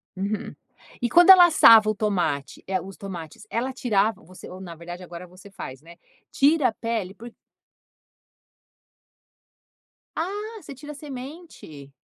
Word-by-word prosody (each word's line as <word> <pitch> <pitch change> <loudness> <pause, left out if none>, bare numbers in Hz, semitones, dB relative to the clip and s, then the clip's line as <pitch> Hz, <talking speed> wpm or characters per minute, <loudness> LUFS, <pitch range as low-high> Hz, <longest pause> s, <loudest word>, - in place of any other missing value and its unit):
Uhum. 200 +3 -4 0.5
E 240 - 0
quando 350 +7 +5
ela 360 -2 +9
assava 225 -9 +7
o 215 - -1
tomate, 180 -10 -2
eh, 190 -1 -1
os 190 +2 -11
tomates, 190 +1 -9
ela 255 +3 -2
tirava 220 -5 0
você 180 +3 -13
ou 185 - -10
na 175 -3 -9
verdade, 175 +2 -9
agora 175 0 -10
você 185 +3 -16
faz, 135 -8 -9
né. 170 +2 -15 0.4
Tira 290 0 +3
a - - -2
pele 220 -5 -4
por 230 +4 -12 2.8
Ah, 415 +6 -5
você 280 - -11
tira 295 +3 -10
a - - -10
semente. 270 - -11
215 Hz, 145 wpm, -24 LUFS, 180-275 Hz, 2.8 s, ela